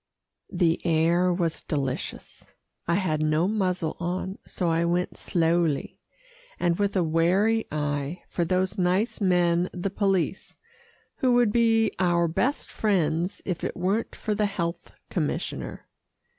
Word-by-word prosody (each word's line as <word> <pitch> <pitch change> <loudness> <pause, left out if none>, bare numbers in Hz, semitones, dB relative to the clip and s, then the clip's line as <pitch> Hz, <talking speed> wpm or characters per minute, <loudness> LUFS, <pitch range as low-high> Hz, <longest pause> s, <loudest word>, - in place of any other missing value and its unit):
The 165 -2 +1
air 170 +2 +3
was 170 -2 -1
delicious. 135 -5 -5 0.3
I 170 - +2
had 165 -6 0
no 155 +3 +2
muzzle 185 -6 -1
on, 185 +2 -3
so 180 - -2
I 165 0 +2
went 175 +1 0
slowly, 165 -3 0 0.6
and 170 +1 +1
with 200 0 0
a 185 - +3
wary 185 +8 +2
eye 145 +2 -2
for 175 - -1
those 185 +3 0
nice 185 +6 +1
men 175 -2 +2
the 180 +2 -3
police, 195 -3 -1 0.6
who 255 -2 +2
would 240 -3 +4
be 225 -2 +3
our 175 -2 +3
best 250 - -1
friends 175 -4 0
if 180 -3 -3
it - - -3
weren't 195 +6 -1
for 215 - -2
the 210 0 +1
health 170 -4 -4 0.2
commissioner. - - -3
180 Hz, 135 wpm, -26 LUFS, 165-195 Hz, 0.6 s, would